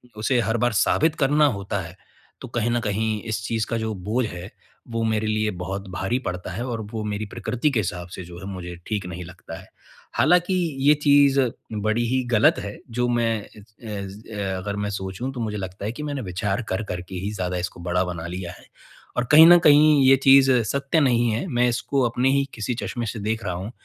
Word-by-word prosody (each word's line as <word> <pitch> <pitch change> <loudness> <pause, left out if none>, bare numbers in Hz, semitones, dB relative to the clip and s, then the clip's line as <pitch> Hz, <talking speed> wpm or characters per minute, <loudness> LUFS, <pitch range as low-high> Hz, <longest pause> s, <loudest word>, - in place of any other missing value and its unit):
उ - - -10
उसे 120 +3 +1
हर 115 0 0
बार 120 +2 +1
साबित 155 +9 +2
करना 150 +1 +3
होता 100 -6 -1
है, 85 0 -9 0.5
तो - - -7
कहीं 120 -1 -1
न 120 - +1
कहीं 110 0 -1
इस 110 -1 -2
चीज़ 110 +1 -1
का 115 - -1
जो 110 -1 -2
बोझ 105 +6 -1
है, 90 -1 -8 0.4
वो 115 0 -2
मेरे 110 -1 0
लिए 110 0 0
बहुत 95 +2 -5
भारी 95 +7 -1
पड़ता 90 0 -4
है 110 +7 -4
और 115 -3 -3
वो 110 -1 -4
मेरी 105 0 -3
प्रकृति 120 +5 -1
के 125 - +1
हिसाब 90 -3 -3
से 95 - -7
जो 85 0 -10
है 95 - -9
मुझे 90 -1 -7
ठीक 105 -4 -2
नहीं 90 0 -6
लगता 85 -1 -10
है। - - -15 0.5
हालाँकि 175 +4 +4 0.3
ये 150 - +8
चीज़ 140 -1 +5 0.3
बड़ी 110 +2 0
ही 130 +2 +1
ग़लत 110 0 +4
है 100 0 -6
जो 120 +1 0
मैं 115 -2 +1
अ - - -16
अ, 105 -2 -6
अगर 100 +2 -4
मैं 105 0 -2
सोचूँ 95 +5 -4
तो 125 - -7
मुझे 110 -2 -3
लगता 95 0 -6
है 105 - -1
कि 120 +6 -7
मैंने 145 -2 -3
विचार 95 +1 -2
कर-कर 95 -2 -3
के 95 - -7
ही 95 +3 -3
ज़्यादा 90 -2 -2
इसको 90 0 -4
बड़ा 90 +1 +2
बना 85 -2 -5
लिया 90 0 -5
है - - -18 0.5
और 125 - +1
कहीं 155 +2 +10
न 175 0 +9
कहीं 150 -1 +6
ये 135 - +8
चीज़ 135 0 +7
सत्य 140 +7 0
नहीं 120 -4 +3
है। 110 +8 -2
मैं 125 -5 +2
इसको 135 +3 -1
अपने 125 +3 +1
ही 140 +1 +2
किसी 115 +2 -3
चश्मे 120 -2 -3
से 110 0 -4
देख 110 +2 -2
रहा 90 - -1
हूँ, 95 +5 -5
110 Hz, 220 wpm, -23 LUFS, 95-125 Hz, 0.5 s, कहीं